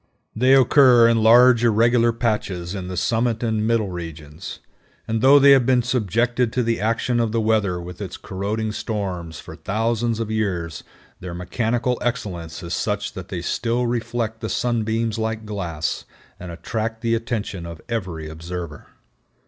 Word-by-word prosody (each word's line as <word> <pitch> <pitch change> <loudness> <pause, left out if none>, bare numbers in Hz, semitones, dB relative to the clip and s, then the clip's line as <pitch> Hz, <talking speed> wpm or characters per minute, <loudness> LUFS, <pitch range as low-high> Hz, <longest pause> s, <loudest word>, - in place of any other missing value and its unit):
They 130 +4 +5
occur 130 -2 +6
in 115 -1 +3
large 120 +2 +6
irregular 115 +1 +4
patches 105 -6 -2
in 95 -3 -5
the 90 0 -5
summit 115 +3 0
and 110 -2 0
middle 115 -3 +1
regions, 80 -1 -8 0.5
and 110 0 -1
though 135 +3 +7
they 140 0 +7
have 130 -3 +5
been 125 -2 +3
subjected 120 +1 0
to 125 - +1
the 115 0 0
action 115 +2 0
of 115 -2 +1
the 115 - 0
weather 110 -5 +1
with 90 +2 -9
its 95 -4 -6
corroding 105 +3 -3
storms 95 -7 -4
for - - -10
thousands 115 +2 -1
of 110 -1 -3
years, 90 -7 -2 0.4
their 90 -2 -7
mechanical 115 +7 -1
excellence 90 -9 -4
is 85 0 -5
such 105 +2 -2
that 95 -1 -8
they 90 -3 -5
still 120 +6 -1
reflect 115 -1 -2
the 110 - -3
sunbeams 115 -1 -1
like 110 0 -2
glass, 85 -7 -3 0.3
and 90 -1 -7
attract 110 +6 -4
the 115 -1 0
attention 110 -6 -3
of 85 -2 -8
every 90 -9 -4
observer. 80 -1 -7
110 Hz, 160 wpm, -22 LUFS, 90-115 Hz, 0.5 s, though